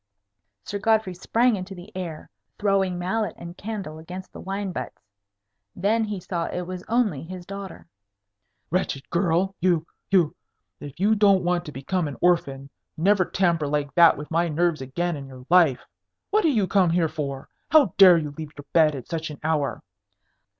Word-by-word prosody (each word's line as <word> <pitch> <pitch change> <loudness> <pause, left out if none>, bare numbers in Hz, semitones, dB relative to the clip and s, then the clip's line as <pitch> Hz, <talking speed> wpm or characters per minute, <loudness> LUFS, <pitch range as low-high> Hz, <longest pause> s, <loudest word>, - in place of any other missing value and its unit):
Sir 205 - -4
Godfrey 220 -3 +2
sprang 230 +6 +2
into 190 0 -6
the 185 +5 -13
air, 170 -4 -6 0.3
throwing 195 -3 +1
mallet 190 +2 -2
and 170 0 -9
candle 195 -7 -6
against 180 +4 -9
the - - -9
wine 195 +1 -3
butts. 175 - -7 0.7
Then 215 +5 +1
he 205 -2 -4
saw 170 -1 -3
it 180 - -4
was 180 0 -6
only 220 - +1
his 180 +2 -8
daughter. 195 -1 -8 0.9
"Wretched 160 -6 -1
girl! 175 +2 +1
you 175 -3 +2 0.2
you 180 -6 +3 0.4
if 145 +2 -10
you 205 +3 +3
don't 200 -3 +4
want 175 0 0
to 150 - -7
become 160 +5 -2
an 145 - -7
orphan, 140 -6 +1 0.3
never 190 +4 +3
tamper 170 -6 +1
like 145 -1 -1
that 170 -1 +6
with 150 +2 -8
my 170 +1 +2
nerves 165 -1 0
again 170 +6 -2
in 140 -2 -8
your 130 -1 -12
life. 165 -8 +4 0.5
What 425 -2 +3
are - - +5
you 220 -9 +2
come 185 -1 +3
here 165 0 +2
for? 145 -4 -5 0.2
How 290 - +5
dare 185 -3 +9
you 150 -3 -3
leave 150 +1 -8
your 145 - -10
bed 155 -3 +4
at 130 - -8
such 160 -1 -4
an 150 - -8
hour?" 150 -6 -1
175 Hz, 180 wpm, -24 LUFS, 155-195 Hz, 0.9 s, dare